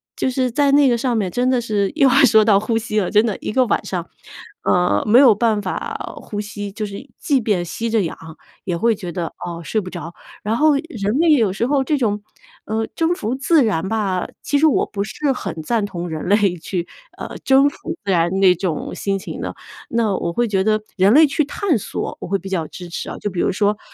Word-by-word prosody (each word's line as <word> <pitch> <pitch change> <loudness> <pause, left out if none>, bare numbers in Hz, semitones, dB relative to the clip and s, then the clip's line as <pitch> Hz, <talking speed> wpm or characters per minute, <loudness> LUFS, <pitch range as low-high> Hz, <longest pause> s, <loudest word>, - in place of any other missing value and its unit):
就 - - 0
是 255 0 0
在 280 +3 +2
那 285 -2 +5
个 240 - +2
上 245 0 0
面 200 -4 0
真 250 +6 +1
的 255 -2 +2
是 205 -4 -1
又 275 -4 +5
要 - - +2
说 220 -3 +5
到 200 -3 +5
呼 225 +2 -1
吸 215 -2 -1
了， 185 - -1
真 210 +1 +5
的 215 -4 -2
一 - - -4
个 255 +1 +3
晚 - - 0
上， - - -4 0.6
呃， 180 0 +2
没 230 +4 +6
有 250 -7 +7
办 220 -2 +1
法 185 - -5
呼 205 - -6
吸， 205 -1 -6
就 215 +1 -4
是 205 +8 -9
即 275 -4 +1
便 205 -5 0
吸 230 +7 -4
着 225 -1 +2
氧 165 - -4 0.5
也 180 - -1
会 230 +4 +2
觉 180 -3 -7
得， 175 -2 -3 0.2
哦， 170 -1 -6
睡 215 +7 -1
不 185 - -7
着。 175 -1 -7 0.3
然 215 +2 0
后 310 +1 +4
人 235 - -3
类 335 -1 +4
有 225 -8 +3
时 230 +4 -1
候 275 -1 +2
这 295 +2 0
种， 210 -5 -1 0.4
呃， 220 +1 -2
征 330 +1 +1
服 240 -4 -3
自 295 +2 +3
然 190 -4 -1
吧， 200 -5 -1 0.2
其 285 - +1
实 315 - +4
我 300 - +2
不 200 -1 -3
是 270 +7 -1
很 165 -9 -5
赞 220 +4 0
同 175 -3 -5
人 155 -1 -5
类 200 -3 +3
去， 175 +1 -4 0.3
呃， - - -7
征 275 +1 +5
服 335 +4 -7
自 195 - 0
然 170 -1 +2
那 185 -2 +5
种 170 -3 -3
心 195 -1 -2
情 - - -7
的。 - - -4 0.4
那 225 -4 +1
我 170 - -2
会 240 +3 +1
觉 195 -2 +1
得 215 +1 +1 0.2
人 195 +3 +5
类 310 +3 +7
去 305 +2 +1
探 325 - 0
索， 205 - -5
我 - - -5
会 195 +2 0
比 195 - -9
较 175 -4 -1
支 175 +3 -10
持 170 - -5
啊， - - -6
就 205 - -3
比 175 - -2
如 - - +1
说 205 +2 +1
他 - - -31
215 Hz, 260 characters per minute, -20 LUFS, 190-250 Hz, 0.6 s, 有